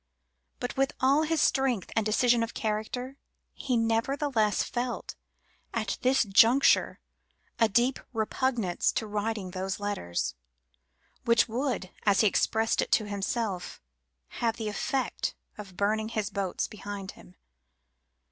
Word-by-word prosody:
But, 245 +2 -4
with 270 0 +1
all 275 +3 +4
his 315 -1 +1
strength 260 -8 +1
and 225 - +2
decision 235 +3 +3
of 230 0 -3
character, 235 +5 -3 0.4
he 255 -3 -1
nevertheless 230 0 +1
felt, 245 0 -3 0.6
at 215 -4 -2
this 255 0 +3
juncture, 225 +6 +4 0.6
a 225 -2 +4
deep 240 +5 +2
repugnance 225 -4 0
to 220 - -1
writing 210 -2 -3
those 190 +1 -3
letters, 200 - -2 0.9
which 235 0 +4
would, 240 -5 -2
as 200 -1 +4
he 215 - +5
expressed 220 +3 +2
it - - -4
to 215 - +3
himself, 200 -1 -3 0.6
have 230 -1 0
the 220 -2 -3
effect 260 +5 -2 0.2
of 195 -4 -10
burning 215 +2 0
his 215 -2 -2
boats 195 -2 -2
behind 205 -2 -7
him. 180 - -17
225 Hz, 130 wpm, -28 LUFS, 205-245 Hz, 0.9 s, he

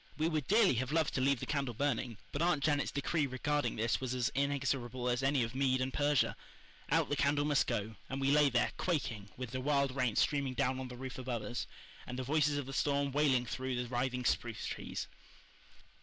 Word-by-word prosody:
We 155 +1 +1
would 155 -4 -1
dearly 215 -6 +5
have 130 +1 -4
loved 160 -2 +1
to 130 - 0
leave 135 -1 +3
the - - -2
candle 140 -5 -2
burning, 125 -3 -1
but 145 - -3
Aunt 170 -5 +2
Janet's 145 -1 +2
decree 145 +1 0
regarding 145 +3 -1
this 115 +3 0
was 130 -1 -2
as 125 -2 +1
inexorable 135 -3 -1
as 125 +1 +1
any 135 -1 +2
of 115 +1 -4
Mede 130 -1 +2
and 130 0 -1
Persia. 145 -2 +2 0.5
Out - - +2
the 145 - +1
candle 145 0 +2
must 145 -2 +2
go; 110 +1 -2
and 135 - -3
we 135 0 +2
lay 150 -1 +5
there, 120 -1 +2
quaking, 120 - -2
with 125 -3 -5
the 130 0 -3
wild 140 -1 +1
rain 125 -5 +1
streaming 140 -3 +1
down 130 +2 +1
on 130 - -4
the 125 -1 -9
roof 130 0 -6
above 120 -4 -3
us, 120 +4 -4 0.4
and 125 - -5
the 130 - -2
voices 150 +1 +2
of 145 - -2
the 135 - -7
storm 140 0 +1
wailing 135 -3 +3
through 130 +2 -3
the 125 0 -2
writhing 125 0 -1
spruce 120 -2 0
trees. - - -4
135 Hz, 215 wpm, -34 LUFS, 125-145 Hz, 0.5 s, dearly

